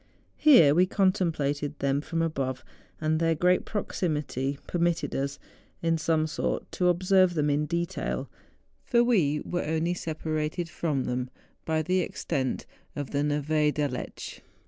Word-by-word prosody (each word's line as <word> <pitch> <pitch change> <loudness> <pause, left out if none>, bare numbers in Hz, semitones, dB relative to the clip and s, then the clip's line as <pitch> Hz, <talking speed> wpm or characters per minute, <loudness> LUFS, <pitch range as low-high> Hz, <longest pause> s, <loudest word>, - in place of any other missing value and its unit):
Here 210 - +7
we 180 +4 +4
contemplated 155 -7 0
them 140 +1 0
from 165 +2 -2
above, 135 -5 -2 0.3
and 155 0 +1
their 165 0 +2
great 180 +3 +2
proximity 150 - -2
permitted 170 -1 0
us, 140 +1 -2 0.5
in 165 -1 +2
some 160 0 +1
sort, 155 -1 -3
to 180 - +1
observe 185 0 +3
them 150 -2 +2
in 150 +1 0
detail, 170 +1 -2 0.6
for 240 -3 +3
we 165 -12 +2
were 175 - -2
only 160 +2 0
separated 160 0 -3
from 155 -4 -1
them 125 0 -2 0.4
by 160 -1 0
the 185 +3 +1
extent 135 -7 -2 0.3
of 145 -2 -4
the 140 - 0
Neve 150 +1 +1
d'Aletsch. 145 -4 -4
155 Hz, 140 wpm, -27 LUFS, 145-175 Hz, 0.6 s, Here